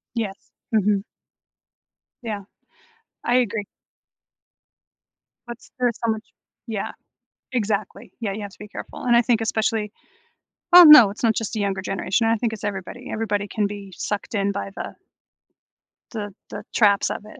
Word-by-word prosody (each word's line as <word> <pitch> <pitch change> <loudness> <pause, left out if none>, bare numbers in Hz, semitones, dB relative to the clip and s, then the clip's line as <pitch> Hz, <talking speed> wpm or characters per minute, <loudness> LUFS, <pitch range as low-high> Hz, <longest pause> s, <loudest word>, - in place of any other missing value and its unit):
Yeah, 220 -4 -1 0.4
mhm. 205 -2 +2 1.2
Yeah, 215 -4 -4 0.8
I 245 - +3
agree. 225 -4 0 1.8
But 240 -1 -6
s - - -19
there's 245 -2 +1
so 230 - +2
much 220 0 -4 0.4
Yeah, 215 -3 -3 0.6
exactly, 210 -6 -2
yeah, 210 -4 -2
you 210 - -6
have 205 -1 -6
to - - -19
be 210 - -9
careful, - - -9
and 240 -1 +4
I 235 - +6
think 230 -1 +1
especially 220 -1 0 0.8
Oh, 360 - +12
no, 275 -10 +10
it's 205 - -9
not 225 -2 +3
just 225 -1 -3
the 220 - -2
younger 195 -1 -1
generation, 195 +4 0
I 225 0 +3
think 225 0 -1
it's 210 - -10
everybody. 205 +5 -5
Everybody 210 -2 -1
can 205 0 -1
be 200 -1 -8
sucked 210 +2 -4
in 200 -1 +1
by 195 0 -4
the - - -6 1.2
the 205 -4 -5 0.2
the - - -7
traps 200 -3 +4
of - - -5
it, 215 - -13
215 Hz, 160 wpm, -23 LUFS, 200-230 Hz, 1.8 s, Oh